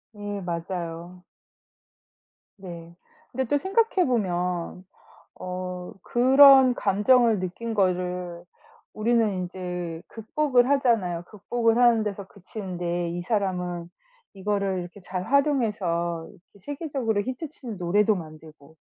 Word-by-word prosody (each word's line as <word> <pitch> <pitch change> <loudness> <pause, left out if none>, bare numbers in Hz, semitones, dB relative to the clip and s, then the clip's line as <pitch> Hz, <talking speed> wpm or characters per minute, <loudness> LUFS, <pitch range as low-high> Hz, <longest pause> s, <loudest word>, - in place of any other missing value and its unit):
예 205 -1 -5
맞아요. 170 0 -5 1.4
네. 170 -3 -10 0.4
근데 265 +2 -1
또 290 - +1
생각해 385 +2 +2
보면 180 -5 -1 0.6
어 180 +1 -5
그런 265 +1 +7
감정을 220 +2 +3
느낀 185 +6 -4
거를 180 -3 -1 0.5
우리는 230 0 +2
인제 180 -2 -5
극복을 245 +3 +1
하잖아요. 225 -11 +1
극복을 225 +2 0
하는 240 -2 +5
데서 200 -1 -4
그치는데 180 -4 -4
이 175 +1 -4
사람은 180 -4 -2 0.4
이거를 200 -1 -1
이렇게 175 +3 -9
잘 180 0 -4
활용해서 205 - 0
이렇게 200 0 -21
세계적으로 270 - -2
히트 260 +7 -5
치는 245 -8 -8
노래도 205 +4 +2
만들고. 155 -3 -11
195 Hz, 250 characters per minute, -25 LUFS, 175-235 Hz, 1.4 s, 그런